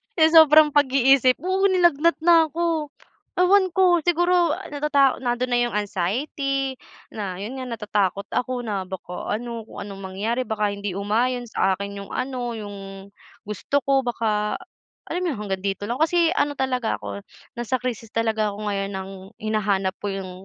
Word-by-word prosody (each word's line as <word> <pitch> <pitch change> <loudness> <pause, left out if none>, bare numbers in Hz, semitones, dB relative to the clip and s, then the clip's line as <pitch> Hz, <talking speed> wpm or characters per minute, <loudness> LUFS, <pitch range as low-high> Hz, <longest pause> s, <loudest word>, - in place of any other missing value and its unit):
sa 320 -1 +4
sobrang 305 0 +6
pag-iisip, 270 -2 +4
oo, 380 +2 +2
nilagnat 345 -4 +3
na 330 -1 +6
ko. 330 -3 0 0.5
Ewan 370 0 +4
ko, 365 -2 +5
siguro 350 -1 +3 0.2
natata 285 -2 +2
nandun 245 0 -1
na 245 - +3
yung 240 - -4
anxiety 265 - -2 0.3
na, 200 -4 -4
yun 235 +6 -6
nga, 260 - -5
natatakot 205 -4 -1
ako 250 0 -1
na 200 -4 -3
baka 180 -1 -7
ano, 230 0 -6
kung - - -9
anong 200 -1 -9
mangyari, 220 +7 -2
baka 215 -2 0
hindi 200 -1 -4
umayon 235 +5 -1
sa 195 -3 +1
akin 200 +1 -6
yung 200 - -9
ano, 250 -2 -3
yung 205 -2 -7 0.6
gusto 210 +7 -2
ko, 270 0 +1
baka, 215 -3 0 0.6
alam 350 - -1
mo 335 - 0
yun, - - -7
hanggang 195 -2 -4
dito 200 +1 -2
lang. 240 - -1
Kasi 330 +2 +3
ano 290 0 +1
talaga 255 -4 -1
ako, 100 -1 -7 0.3
nasa 240 +2 -2
krisis 230 -3 -5
talaga 220 -2 0
ako 210 +1 -4
ngayon 195 0 -2
ng 190 - -8 0.3
hinahanap 205 -3 0
ko 205 -1 -4
yung 190 -1 -5
240 Hz, 165 wpm, -23 LUFS, 205-285 Hz, 0.6 s, sobrang